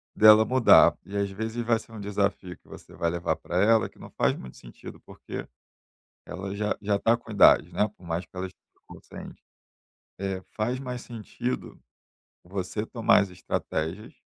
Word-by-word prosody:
dela 110 0 +8
mudar 130 0 +6
e, 100 - -9
às 100 0 0
vezes, 110 +4 -4
vai 115 -1 +2
ser 115 - -15
um 110 - -8
desafio 100 -2 -2
que - - -30
você - - -13
vai 85 -1 -1
levar 85 0 -1
pra 90 - -4
ela 110 +1 +4
que - - -22
não - - -11
faz - - +1
muito 65 - -11
sentido, - - -12
porque - - -9 0.8
ela 95 +2 -6
já 105 0 -1
já 100 -1 0
tá 115 - +3
com 120 -2 -12
idade, 105 - +5
né, 105 - +1
por 90 - -16
mais 85 +1 -3
que 85 - -26
ela 95 +1 -3
esteja 90 - -23
consciente. - - -12 0.8
É, 95 -1 -3 0.2
faz 120 +4 -1
mais 125 -2 -6
sentido 120 +2 -5 0.7
você 95 +3 -4
tomar 115 -3 +3
as 100 - -3
estratégias 90 +1 -4
100 Hz, 175 wpm, -26 LUFS, 95-115 Hz, 0.8 s, dela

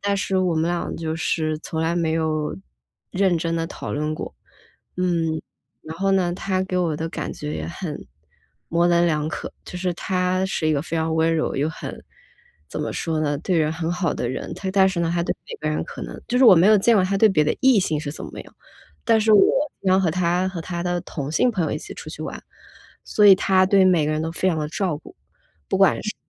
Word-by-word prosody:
但 200 0 0
是 195 -1 0
我 180 -2 +1
们 160 - +1
俩 175 -1 -3
就 160 -1 -3
是 160 -1 -1
从 160 0 -4
来 165 +1 0
没 170 -2 0
有 155 -5 -1 0.5
认 190 -2 +2
真 165 0 -2
地 165 0 -1
讨 - - -7
论 150 +1 -2
过。 - - -7 0.6
嗯， 165 -3 0 0.4
然 160 - -8
后 195 0 +1
呢， 180 -2 +2
他 185 +1 -1
给 185 -1 -2
我 165 -4 0
的 160 - -3
感 - - -4
觉 150 0 -5
也 - - -4
很 170 -3 -6 0.6
模 170 +1 +2
棱 170 0 +4
两 155 -2 0
可。 - - -6
就 - - -8
是 180 -1 -1
他 185 +1 0
是 175 -4 -2
一 - - +3
个 145 - +1
非 165 +1 -4
常 160 0 0
温 160 +1 +2
柔， 155 - -1
又 145 +3 0
很 160 - -8 0.7
怎 - - -5
么 - - -2
说 160 -1 -2
呢？ 145 -1 0
对 175 +3 -1
人 155 -1 +2
很 165 +1 -2
好 175 -3 0
的 120 - -2
人。 130 - -5 0.2
但 190 -1 +5
是 190 -2 -3
呢， 165 -1 0
他 170 - +1
对 - - -1
每 - - -7
个 155 - -2
人 155 - -1
呢 - - -2
可 - - -9
能 - - -7
就 250 - +1
是 260 - +6
我 190 -7 +9
没 170 - +5
有 215 0 +7
见 230 +3 +4
过 190 - +3
他 195 +1 0
对 220 - +6
别 155 -7 +2
的 150 - +1
异 260 -4 +5
性 155 -5 0
是 150 -2 -5
怎 - - -8
么 - - -9
样， - - -14 0.5
但 225 -1 +4
是 220 0 +3
我 210 - +7 0.4
经 195 - 0
常 190 +1 +4
和 180 -4 +1
他 180 +2 +1
和 185 -3 -5
他 170 +1 -4
的 175 0 -1
同 145 -5 -5
性 245 +10 +2
朋 185 -6 0
友 - - -2
一 - - -2
起 - - -9
出 - - -9
去 - - -9
玩， - - -6 0.6
所 210 - +2
以 195 - +10
他 190 0 +3
对 195 0 +4
每 180 -4 +4
个 - - 0
人 155 - -1
都 160 0 -3
非 185 +2 0
常 165 -3 0
地 150 -1 -2
照 175 -1 -1
顾。 - - -15 0.5
不 - - 0
管 - - +4
是 - - -3
170 Hz, 270 characters per minute, -22 LUFS, 160-185 Hz, 0.7 s, 以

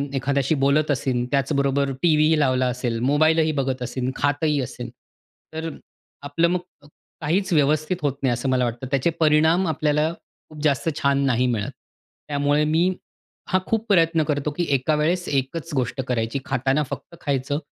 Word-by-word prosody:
एखाद्याशी 140 +2 +1
बोलत 145 +2 +3
असेन 125 -3 0
त्याचबरोबर 140 0 +1
टीव्हीही 155 -2 +4
लावला 130 -3 +2
असेल, 125 -2 -2
मोबाईलही 155 +2 +3
बघत 130 -1 -1
असेन, 125 +1 -3
खातही 145 +1 +1
असेल. 120 -1 -6 0.6
तर 160 +1 -4 0.5
आपलं 145 +4 +1
मग 180 +1 +1 0.6
काहीच 185 +6 0
व्यवस्थित 155 +3 +2
होत 145 -3 0
नाही 130 -2 +3
असं 120 +3 -2
मला 130 -1 +2
वाटतं. 120 +2 -4
त्याचे 140 +4 +2
परिणाम 160 +3 +3
आपल्याला 155 -1 +1 0.4
खूप 155 -1 -10
जास्त 150 +1 +1
छान 140 0 +2
नाही 125 -1 +2
मिळत. 110 -5 -1 0.6
त्यामुळे 145 +1 +1
मी 165 +4 +2 0.6
हा 185 -2 +3
खूप 225 0 0
प्रयत्न 165 -4 +3
करतो, 150 -1 -1
की 175 +4 -2
एका 135 +4 +1
वेळेस 170 +4 0
एकच 145 +4 -2
गोष्ट 130 0 -1
करायची. 115 +1 -1
खाताना 135 +3 +1
फक्त 140 +5 -7
खायचं. 140 0 -1
145 Hz, 150 wpm, -23 LUFS, 130-155 Hz, 0.6 s, टीव्हीही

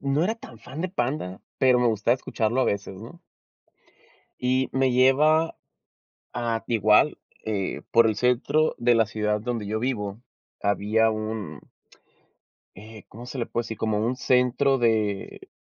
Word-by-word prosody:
No 155 - +3
era 215 +5 +1
tan 115 - -14
fan 150 +4 -7
de 185 - -2
Panda, 120 - -3 0.2
pero 125 -2 +4
me 125 - +3
gustaba 110 +1 +2
escucharlo 120 -1 -1
a - - +2
veces, 100 -1 -3
¿no? 120 +10 -11 1.2
Y 130 +1 +1
me 130 -1 +1
lleva 150 +6 +3 0.8
a 115 -2 -2
igual, 110 +5 +3 0.3
eh, 100 -3 -3
por 115 -1 +5
el 110 - +1
centro 125 +7 +1
de 120 0 +3
la 115 -1 +3
ciudad 105 0 -1
donde 115 -2 -3
yo 110 +2 -2
vivo 110 -4 -3 0.4
había 105 +3 +2
un 110 -8 -5 1.2
eh, 110 +2 -12
¿cómo 120 +3 -11
se 125 +1 -6
le 120 - -1
puede 120 - -3
decir? 110 -1 -7
Como 110 -2 -1
un 125 +2 -1
centro 130 +2 +2
de 110 -5 -1
115 Hz, 155 wpm, -25 LUFS, 105-130 Hz, 1.2 s, por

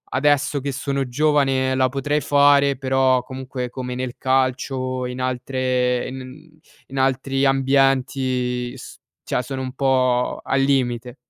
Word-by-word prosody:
adesso 145 +1 +2
che 140 0 -3
sono 140 0 -2
giovane 135 -2 +2
la 130 -1 +2
potrei 145 +3 -1
fare 140 -1 +4
però 130 -1 +2
comunque 130 -1 -6
come 125 -1 -5
nel 130 -1 -4
calcio 130 -1 -1
e - - -4
in 125 - -7
altre 130 -1 -1
e - - -6
n 145 +5 -11 0.3
in 135 - -8
altri 135 +1 +1
ambienti 130 -2 +1
s - - -11 0.2
cioè - - -1
sono 130 +1 -5
un 130 0 -5
po' 130 -2 +1
al 135 0 +1
limite. 125 -2 0
130 Hz, 145 wpm, -21 LUFS, 125-135 Hz, 0.3 s, fare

